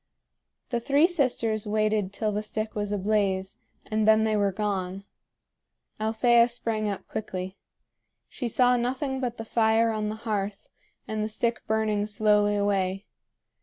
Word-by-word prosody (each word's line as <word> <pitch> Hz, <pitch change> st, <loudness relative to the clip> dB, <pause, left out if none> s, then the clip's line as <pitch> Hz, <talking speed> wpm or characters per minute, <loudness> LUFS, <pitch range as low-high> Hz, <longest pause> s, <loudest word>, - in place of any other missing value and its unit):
The 240 Hz, -, 0 dB
three 280 Hz, +6 st, +3 dB
sisters 235 Hz, -, 0 dB
waited 215 Hz, -2 st, +1 dB
till 215 Hz, +1 st, -1 dB
the 210 Hz, +1 st, -1 dB
stick 215 Hz, +1 st, -4 dB
was 205 Hz, -1 st, -2 dB
ablaze, 195 Hz, -2 st, 0 dB, 0.3 s
and 215 Hz, 0 st, 0 dB
then 220 Hz, 0 st, +6 dB
they 220 Hz, -1 st, +1 dB
were 200 Hz, -1 st, +2 dB
gone. 195 Hz, -1 st, -3 dB, 1.0 s
Althea 235 Hz, +2 st, +4 dB
sprang 225 Hz, -3 st, -2 dB
up 200 Hz, -, -5 dB
quickly. 185 Hz, -2 st, -5 dB, 0.7 s
She 245 Hz, -, -5 dB
saw 250 Hz, +2 st, +3 dB
nothing 260 Hz, +2 st, -2 dB
but 245 Hz, -2 st, -3 dB
the 225 Hz, -, -6 dB
fire 225 Hz, 0 st, +3 dB
on 215 Hz, -1 st, -2 dB
the 215 Hz, -, -4 dB
hearth 205 Hz, -2 st, -3 dB, 0.4 s
and 215 Hz, -1 st, -2 dB
the 215 Hz, -, -2 dB
stick 235 Hz, +2 st, -1 dB
burning 215 Hz, -1 st, 0 dB
slowly 210 Hz, 0 st, +3 dB
away. 195 Hz, -1 st, 0 dB
215 Hz, 145 wpm, -26 LUFS, 205-230 Hz, 1.0 s, then